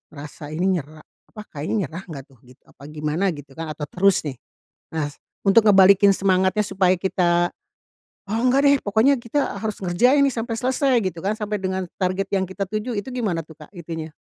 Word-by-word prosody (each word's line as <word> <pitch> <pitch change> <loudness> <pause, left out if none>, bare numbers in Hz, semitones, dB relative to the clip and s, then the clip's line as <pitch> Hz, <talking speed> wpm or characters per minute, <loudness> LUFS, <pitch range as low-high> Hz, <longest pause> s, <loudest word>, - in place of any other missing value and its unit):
rasa 145 +1 -9
ini 185 +3 +1
nyera 155 +2 -12 0.3
apa 215 - -10
kayaknya 150 +8 -3
nyerah 170 +6 -8
nggak 140 -4 -7
tuh 120 - -23
gitu 125 +1 -19
apa 140 - -18
gimana 155 +5 -1
gitu 145 -1 -12
kan, 160 -2 -5
atau 150 - -8
terus 195 +1 +3
nih. 135 -5 -5 0.6
Nah, 150 -2 0 0.4
untuk 195 +4 +7
ngebalikin 195 0 +7
semangatnya 190 +2 +2
supaya 190 -1 +2
kita, 175 -2 +1 0.8
"Oh, 225 +1 0
enggak 255 +3 +3
deh 280 0 +6
pokoknya 225 +7 +2
kita 265 +5 -2
harus 215 -2 -4
ngerjain 250 +11 +3
nih 275 - +2
sampai 230 0 -3
selesai," 260 +1 +1
gitu 170 -3 -3
kan, 210 +2 +1
"sampai 210 -1 -3
dengan 190 0 -2 0.2
target 185 +1 0
yang 190 -1 +1
kita 195 +1 -3
tuju," 215 +3 -3
itu 205 +5 -4
gimana 200 -10 -2
tuh 160 - -14
Kak, 150 - -13
itunya? 165 -2 -6
190 Hz, 190 wpm, -22 LUFS, 165-215 Hz, 0.8 s, untuk